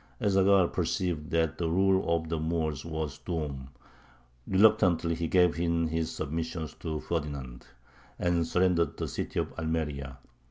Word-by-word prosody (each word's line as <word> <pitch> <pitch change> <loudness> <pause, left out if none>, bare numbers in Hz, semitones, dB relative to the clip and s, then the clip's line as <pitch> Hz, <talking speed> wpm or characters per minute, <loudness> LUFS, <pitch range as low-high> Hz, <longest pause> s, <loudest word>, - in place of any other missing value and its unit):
Ez 100 - +1
Zaghal 95 -1 +5
perceived 85 -5 -1
that 80 -2 0
the 85 -2 0
rule 95 +1 +2
of 80 -1 -3
the 80 0 -2
Moors 80 -3 -1
was 80 -3 -4
doomed: 75 -6 -4 0.8
reluctantly 95 -5 +4
he 85 0 -2
gave 90 -1 +3
in 85 -1 +1
his 80 0 -1
submission 80 +1 -3
to 80 -2 -3
Ferdinand, 70 -7 -4 0.5
and 85 -2 +1
surrendered 90 -2 +2
the - - -2
city - - -4
of - - -3
Almeria. 75 -5 -3
80 Hz, 145 wpm, -29 LUFS, 75-85 Hz, 0.8 s, Zaghal